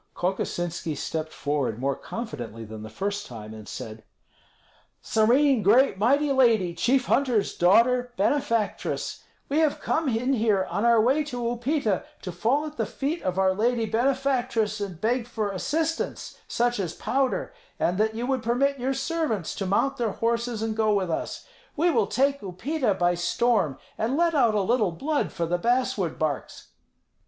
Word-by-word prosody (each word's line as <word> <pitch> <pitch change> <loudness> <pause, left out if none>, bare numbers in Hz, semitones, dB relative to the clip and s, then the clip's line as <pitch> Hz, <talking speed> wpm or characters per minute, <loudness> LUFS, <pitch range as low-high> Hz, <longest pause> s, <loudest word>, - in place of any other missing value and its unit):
Kokosinski 175 -3 -2
stepped 160 -1 -3
forward 140 -6 -2
more 135 +2 -1
confidently 120 - -6
than 110 0 -9
the 110 - -8
first 200 - -3
time, 110 -3 -9
and 110 -1 -10
said, 110 0 -7 1.0
"Serene 250 +4 +3
great 215 0 +4
mighty 280 +7 +3
lady, 230 -9 +3
chief 245 +9 +2
hunter's 250 -7 +1
daughter, 245 +7 +4
benefactress; 230 -1 -1 0.2
we 290 +3 +1
have 310 -3 +2
come 315 -3 0
in 250 +3 0
here 215 -5 +2
on 205 - 0
our 235 -1 +5
way 265 +7 +3
to 245 -4 -5
Upita 240 -2 0 0.2
to 185 - -4
fall 240 - +1
at 305 0 -8
the - - 0
feet 295 +5 -3
of 185 0 -2
our 190 0 +3
lady 230 +3 +1
benefactress 240 -2 0
and 185 -5 -5
beg 235 +4 0
for 215 -4 -2
assistance, 320 - -2
such 240 -1 0
as 175 -4 -3
powder, 270 - -1 0.3
and 180 +3 +1
that 220 +1 +1
you 235 +2 -2
would 265 -1 0
permit 265 +4 +1
your 265 +2 -1
servants 270 - -1
to 195 - -3
mount 240 +8 +1
their 230 -4 -1
horses 230 -1 -1
and 220 -1 -2
go 220 -1 +2
with 185 -4 0
us. - - -4 0.3
We 340 +3 +3
will - - +2
take 275 +3 +1
Upita 215 - -1
by 175 0 +3
storm, 175 - +1 0.2
and 235 +6 0
let 340 0 +3
out 235 -7 +3
a 205 - +2
little 210 -3 +1
blood 290 - -1
for 170 -2 -2
the 175 +2 -1
basswood 235 -6 0
barks." 155 -3 -3
225 Hz, 165 wpm, -26 LUFS, 185-265 Hz, 1.0 s, our